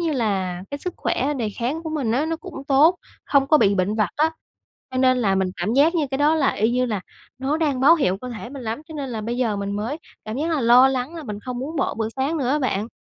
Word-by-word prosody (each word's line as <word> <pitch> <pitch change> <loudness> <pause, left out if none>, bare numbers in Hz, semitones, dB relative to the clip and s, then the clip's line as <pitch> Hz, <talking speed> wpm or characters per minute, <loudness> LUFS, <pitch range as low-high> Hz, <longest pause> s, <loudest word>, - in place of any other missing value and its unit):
như 330 -3 0
là 190 -7 -1
cái 285 - -4
sức 360 +3 -5
khỏe 290 +3 -1
đề 230 -5 -2
kháng 275 +8 -2
của 320 - -5
mình 270 -8 -1
á 285 +6 +1
nó 325 - -1
cũng 330 -5 -9
tốt, 300 +6 +5 0.3
không 275 -1 +3
có 305 - +5
bị 200 -5 +4
bệnh 190 +2 0
vặt 215 -3 +1
á, 310 +2 +3 0.6
cho 260 - -5
nên 255 -1 +4
là 195 -5 +2
mình 190 -1 0
cảm 200 +7 -1
giác 305 +5 +4
như 315 -4 +1
cái 270 - -2
đó 300 +2 +4
là 290 -4 +2
y 220 +3 +1
như 250 +1 +1
là 215 -5 -2 0.4
nó 270 +4 0
đang 290 -5 0
báo 290 +5 +7
hiệu 230 - +1
cơ 250 - -6
thể 235 0 -7
mình 275 -2 -8
lắm, 230 +6 -4
cho 320 - -9
nên 275 -4 -4
là 220 -2 -3
bây 235 +3 -3
giờ 230 -5 0
mình 200 0 -3
mới 230 +8 -3 0.3
cảm 215 +2 -5
giác 315 +5 -1
là 310 -4 +1
lo 245 +3 +6
lắng 265 +4 -2
là 330 - -6
mình 210 -6 -6
không 250 +1 -5
muốn 295 +6 -5
bỏ 275 - 0
bữa 220 -1 -2
sáng 275 +5 0
nữa 255 -4 -1
á 295 - +2
bạn. 225 -6 -1
260 Hz, 285 wpm, -22 LUFS, 220-295 Hz, 0.6 s, báo